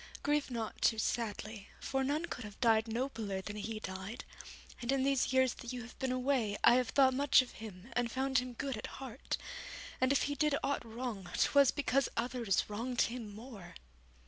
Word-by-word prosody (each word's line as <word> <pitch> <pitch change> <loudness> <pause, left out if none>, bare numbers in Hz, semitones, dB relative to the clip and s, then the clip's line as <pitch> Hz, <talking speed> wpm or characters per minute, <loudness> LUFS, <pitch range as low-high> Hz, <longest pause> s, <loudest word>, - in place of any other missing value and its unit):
Grieve 295 -1 +1
not 230 -3 -4
too 225 - +4
sadly, 215 -2 -2
for 270 0 -1
none 295 +5 0
could 250 - -6
have 210 -1 -9
died 225 -2 +4
nobler 225 -4 -2
than 205 +2 -6
he 215 +1 -4
died; 190 +4 -6 0.6
and 240 +1 0
in 270 -1 +2
these 275 -2 +2
years 260 -1 +4
that 240 - -7
you 250 -1 -5
have 240 - -11
been 260 -1 0
away, 255 -5 +1
I 240 - +8
have 250 -2 +1
thought 265 +1 +5
much 275 0 +5
of 250 - -11
him 215 0 -10
and 245 -1 +1
found 265 0 +2
him 250 0 -5
good 270 0 -3
at 215 - -5
heart, 265 -1 -4 0.6
and 260 +1 +4
if 280 - +3
he 285 - 0
did 295 0 +2
aught 280 - 0
wrong 225 -5 -5
'twas 280 -2 +5
because 275 -1 +1
others 235 -4 +1
wronged 235 +4 -1
him 230 -3 -1
more.' 220 -5 -10
245 Hz, 195 wpm, -34 LUFS, 220-265 Hz, 0.6 s, I